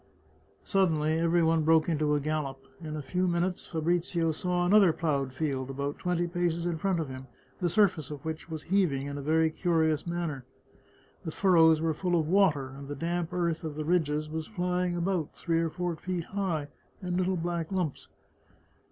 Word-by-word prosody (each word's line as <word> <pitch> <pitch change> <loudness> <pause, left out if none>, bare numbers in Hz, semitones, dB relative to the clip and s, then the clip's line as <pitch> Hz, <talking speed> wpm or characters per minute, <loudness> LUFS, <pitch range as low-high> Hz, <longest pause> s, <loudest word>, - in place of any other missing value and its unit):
Suddenly 160 -5 +2
every 170 +1 +3
one 165 0 +3
broke 160 0 +4
into 150 -3 +1
a - - +2
gallop. 145 -2 -2 0.2
In 155 -2 -5
a 150 - -5
few 180 +7 0
min 170 0 +1
utes 180 0 -3
Fabrizio 170 0 0
saw 175 +2 -1
another 195 -1 +6
ploughed 140 -5 -1
field, 135 -2 -2
about 140 +1 -3
twenty 175 -1 0
paces 170 -1 -1
in 170 -2 -1
front 190 0 0
of 160 - -2
him, 130 0 -8 0.3
the 175 - +1
surface 185 -7 +2
of 145 -1 -8
which 160 +1 -5
was 160 -2 -5
heaving 170 -8 +1
in 140 0 -5
a - - -4
very 160 +2 +2
curious 160 -2 +1
manner. 170 -6 -3 0.8
The - - -4
furrows 160 -3 +4
were 165 -1 +1
full 175 +2 0
of 155 - -1
water, 160 -8 +3
and 135 +1 -10
the 145 - -5
damp 170 +2 -2
earth 170 -2 -1
of 155 -2 -4
the 155 0 -4
ridges 155 -3 +1
was 155 0 -4
flying 180 -3 -1
about, 175 -2 -1
three 165 -1 0
or 165 0 0
four 175 +1 -3
feet 180 +1 -3
high, 170 -6 -2 0.3
in 180 -1 -2
little 185 0 +1
black 170 0 -3
lumps. 180 -7 -2
165 Hz, 190 wpm, -29 LUFS, 155-175 Hz, 0.8 s, another